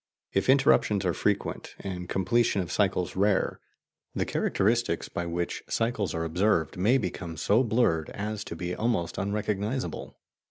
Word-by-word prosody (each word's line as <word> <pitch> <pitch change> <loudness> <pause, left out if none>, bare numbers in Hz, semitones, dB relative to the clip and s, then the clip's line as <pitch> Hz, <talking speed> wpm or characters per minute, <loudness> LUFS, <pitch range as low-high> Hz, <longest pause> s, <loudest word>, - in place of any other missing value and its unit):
If 95 - +1
interruptions 130 -7 +4
are 90 - +2
frequent - - -2
and 90 -2 -5
completion 100 +3 +2
of 90 -3 -3
cycles 95 -3 0
rare, 100 0 +1 0.6
the - - 0
characteristics 110 -3 +1
by 85 - -3
which 85 +1 -2
cycles 110 -7 0
are 80 - -1
observed 85 -1 +1
may 105 +9 +3
become 90 -7 -4
so 105 +8 +3
blurred 110 -10 +1
as 105 0 -4
to - - -6
be 90 +2 -3
almost 110 -7 -1
unrecognizable. 105 +4 -2
100 Hz, 145 wpm, -28 LUFS, 90-110 Hz, 0.6 s, interruptions